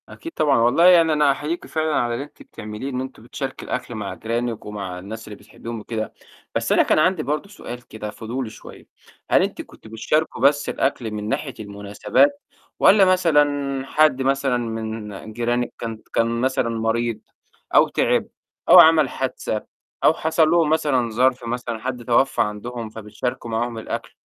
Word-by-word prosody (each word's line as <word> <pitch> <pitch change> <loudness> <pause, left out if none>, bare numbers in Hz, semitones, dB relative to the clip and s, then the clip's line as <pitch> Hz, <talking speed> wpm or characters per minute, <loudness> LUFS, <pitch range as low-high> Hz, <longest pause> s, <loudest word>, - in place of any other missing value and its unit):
أكيد 330 - -9
طبعًا. 145 -4 +3
والله 120 +9 +4
يعني 180 -2 +8
أنا 160 -1 +1
أنا 150 -2 +4
أُحيّيكِ 150 +5 -3
فعلًا 155 -1 -1
على 120 -1 +1
اللي 120 - -3
أنتِ 145 - -20
بتعمليه، 105 +5 -7
إن 130 -1 -3
أنتم 130 -4 -8
بتشاركي 135 +3 -6
الأكل 125 -1 -4
مع 105 -3 -4
جيرانِك 115 0 -3
ومع 100 -4 -6
الناس 110 +4 -8
اللي 105 - -8
بتحبيهم 115 +3 -9
وكده. 110 0 -5 0.4
بس - - -1
أنا - - +5
كان - - +2
عندي 170 0 +2
برضو 150 +8 -3
سؤال 125 -11 -9
كده 105 -1 -7
فضولي 115 +3 -5
شوية، - - -13 0.4
هل - - +6
أنتِ - - -3
كنتم 110 - -15
بتشاركوا 135 +5 -1
بس 145 +2 +3
الأكْل 125 -4 -1
من 105 0 -4
ناحية 135 +1 -2
المناسبات 105 - 0 0.4
والّا 200 -1 +6
مثلًا 145 -7 +2
حد 150 -2 +3
مثلًا 135 -1 +1
من 110 -2 -5
جيرانِك 120 +1 -1
كان 115 -1 -6
ت - - -32
كان 115 0 0
مثلًا 130 -2 +1
مريض 115 0 -1 0.6
أو - - +7
تِعب - - +1 0.4
أو - - +10
عَمل 160 -1 +7
حادثة 125 -4 -3 0.4
أو - - +6
حصل 160 0 +2
لهم 170 -3 +3
مثلًا 140 -6 +1
ظَرف 125 +3 +1
مثلًا، 120 -1 -4
حد 125 0 -4
توفى 125 +3 +2
عندهم 115 +2 -4
فبتشاركوا 110 +2 -5
معاهم 115 +1 -2
الأكل 110 - -5
120 Hz, 170 wpm, -22 LUFS, 110-145 Hz, 0.6 s, أو